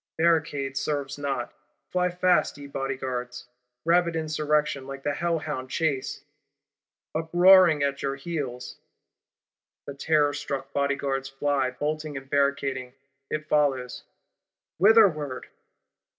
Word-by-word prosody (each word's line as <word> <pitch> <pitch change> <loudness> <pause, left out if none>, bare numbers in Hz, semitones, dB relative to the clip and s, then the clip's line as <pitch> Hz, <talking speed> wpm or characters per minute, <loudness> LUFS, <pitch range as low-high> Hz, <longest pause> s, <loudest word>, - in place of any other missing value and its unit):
Barricading 155 -5 +1
serves 145 0 -3
not: 135 -4 -3 0.4
fly 180 0 +1
fast, 180 -4 +2
ye 145 - -9
Bodyguards; 130 -3 -4 0.4
rabid 170 0 +3
Insurrection, 150 -3 0
like 135 0 -8
the 145 - 0
hellhound 150 -6 -2
Chase, 145 -3 -2 0.9
uproaring 175 -1 +5
at 140 0 -1
your 135 -1 -1
heels! 135 -4 -5 1.1
The 140 - -6
terrorstruck 140 -2 0
Bodyguards 140 -1 -1
fly, 135 -1 0
bolting 150 +2 -3
and 135 0 -9
barricading; 135 -2 0 0.3
it 155 0 -3
follows. 135 -5 0 0.8
Whitherward? 180 - +4
145 Hz, 100 wpm, -26 LUFS, 135-160 Hz, 1.1 s, uproaring